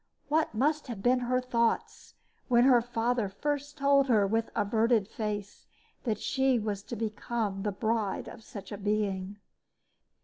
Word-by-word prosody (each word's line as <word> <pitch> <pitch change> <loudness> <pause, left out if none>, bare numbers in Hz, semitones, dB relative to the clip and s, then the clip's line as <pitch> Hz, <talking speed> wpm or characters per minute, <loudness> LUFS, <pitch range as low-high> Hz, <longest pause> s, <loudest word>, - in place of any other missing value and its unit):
What 310 -6 +1
must 295 +6 +1
have 220 -5 -6
been 250 +1 +4
her 250 +1 +1
thoughts 235 -2 -1 0.3
when 240 -1 +5
her 250 -2 +6
father 235 -2 0
first 290 +7 -3
told 280 -1 +4
her 215 -5 +4
with 225 +3 0
averted 220 0 +2
face 210 -2 -5 0.4
that 220 -4 0
she 265 -2 +2
was 210 -3 -2
to 240 - -5
become 215 -2 -2
the 210 +1 -1
bride 215 0 -1
of 225 - -10
such 200 -3 -9
a 205 - -5
being? 205 -1 -1
225 Hz, 150 wpm, -29 LUFS, 205-255 Hz, 0.4 s, her